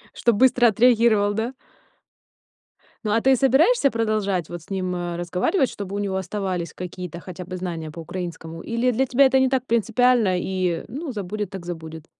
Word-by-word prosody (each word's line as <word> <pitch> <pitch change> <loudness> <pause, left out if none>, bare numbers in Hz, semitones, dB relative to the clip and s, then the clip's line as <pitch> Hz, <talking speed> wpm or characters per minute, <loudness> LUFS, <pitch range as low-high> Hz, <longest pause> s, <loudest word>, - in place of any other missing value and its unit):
Чтобы 235 -4 +1
быстро 250 -2 +5
отреагировал, 220 -2 +4
да? 225 +5 -3 1.5
Ну, 210 - -1
а 225 +2 +2
ты 265 0 +5
собираешься 275 - +4
продолжать 215 -6 -1
вот 175 0 -6
с - - -22
ним, 185 -2 -2
а, 175 -1 -3
разговаривать, 180 - 0
чтобы 200 -1 -6
у 205 - -2
него 195 -2 -2
оставались 185 -3 -3
какие-то 180 -1 -7
хотя 180 0 -8
бы 185 +1 -6
знания 165 -4 -5
по 165 - -10
украинскому, 165 -1 -6
или 235 +2 0
для 255 +3 +1
тебя 265 +2 +4
это 265 0 +4
не 260 -1 +3
так 260 -2 0
принципиально 230 -3 +2
и, 180 -2 -1
ну, 280 +6 -5
забудет 205 -2 -4
так 190 -3 -8
забудет? 160 -2 -7
200 Hz, 175 wpm, -23 LUFS, 180-240 Hz, 1.5 s, быстро